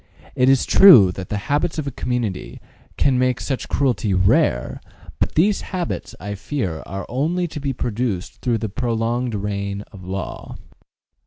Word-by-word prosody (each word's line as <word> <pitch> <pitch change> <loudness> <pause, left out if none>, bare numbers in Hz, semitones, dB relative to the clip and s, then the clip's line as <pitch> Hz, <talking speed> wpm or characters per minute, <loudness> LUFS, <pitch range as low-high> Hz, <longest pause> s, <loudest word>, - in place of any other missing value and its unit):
It 125 +1 +3
is 135 -1 +4
true 120 - +8
that 95 +1 -8
the 105 - -2
habits 150 +4 0
of 155 - -2
a 140 - -3
community 120 -6 -3 0.4
can 130 -3 +2
make 125 -1 +1
such 135 -3 -4
cruelty 120 -8 +1
rare, 90 -9 +2 0.4
but - - -1
these 195 +6 +3
habits, 180 -3 -4
I 100 0 -5
fear, 100 - -3
are 95 0 -5
only 165 +8 -1
to 150 - -6
be 140 -1 -2
produced 115 -6 -3
through 120 -3 +1
the 110 - -3
prolonged 120 +1 -1
reign 100 0 -3
of 95 -4 -12
law. 95 0 -6
120 Hz, 160 wpm, -21 LUFS, 100-140 Hz, 0.4 s, true